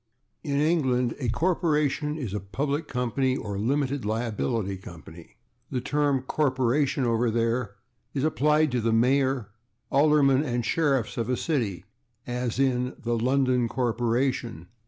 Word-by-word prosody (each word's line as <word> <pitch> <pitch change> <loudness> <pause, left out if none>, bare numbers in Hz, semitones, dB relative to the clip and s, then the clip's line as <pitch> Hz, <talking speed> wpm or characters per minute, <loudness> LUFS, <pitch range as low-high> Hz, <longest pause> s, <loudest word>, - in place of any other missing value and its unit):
In 140 -3 -1
England 130 -6 +2
a 125 -4 -1
corporation 150 -1 0
is 120 -10 -4
a 105 - -1
/public 140 - -3
company/ 130 +1 0
or 100 -2 -5
/limited 135 +5 0
liability 110 -1 -1
company/. 85 +2 -13 0.3
The 130 - -2
term 140 0 0
/corporation/, 130 0 +1
over 115 0 +1
there, 115 -1 -1 0.4
is 135 - 0
applied 150 0 +2
to 125 -1 0
the 115 +1 +1
mayor, 130 0 +2 0.4
aldermen 140 -2 +4
and 120 -5 -2
sheriffs 135 -6 0
of 115 0 -2
a 125 - +1
city, 105 - -2 0.4
as 125 -1 -3
in 130 -1 +1
/the 120 -1 -1
London 130 -1 +2
corporation 120 - -1
125 Hz, 135 wpm, -26 LUFS, 115-140 Hz, 0.4 s, aldermen